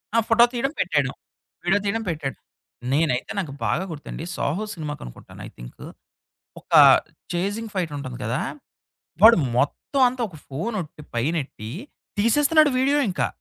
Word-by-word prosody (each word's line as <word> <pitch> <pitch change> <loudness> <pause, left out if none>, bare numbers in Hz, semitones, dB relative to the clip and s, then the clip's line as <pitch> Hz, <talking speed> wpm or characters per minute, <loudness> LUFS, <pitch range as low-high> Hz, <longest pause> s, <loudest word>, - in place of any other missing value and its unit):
ఆ! - - +6
ఫోటో 235 +1 +7
తీయడం 250 +3 -1
పెట్టేయడం. - - +1 0.5
విడియో - - +3
తీయడం 225 +3 -1
పెట్టేయడం. 150 -5 -4 0.5
నేనైతే 140 -3 +1
నాకు 165 -8 -3
బాగా 175 - 0
గుర్తండి, 155 0 -7
'సాహో' 180 +10 -1
సినిమాకనుకుంటాను 150 - -8
ఐ - - -11
థింక్. - - -11 0.8
ఒక - - -21 0.6
చేజింగ్ 205 +6 -2
ఫైట్ 175 -5 -2
ఉంటుంది 130 -4 -6
కదా! 120 +4 -1 0.8
వాడు 230 +2 +9 0.2
మొత్తం 145 - 0
అంతా 250 0 -6
ఒక 160 - -13
ఫోనోట్టి 160 - -4
పైనొట్టి, 130 -4 -2 0.5
తీసేస్తున్నాడు 295 +7 +4
వీడియో 280 +3 +3
ఇంకా. 185 - 0
175 Hz, 130 wpm, -23 LUFS, 140-225 Hz, 0.8 s, వాడు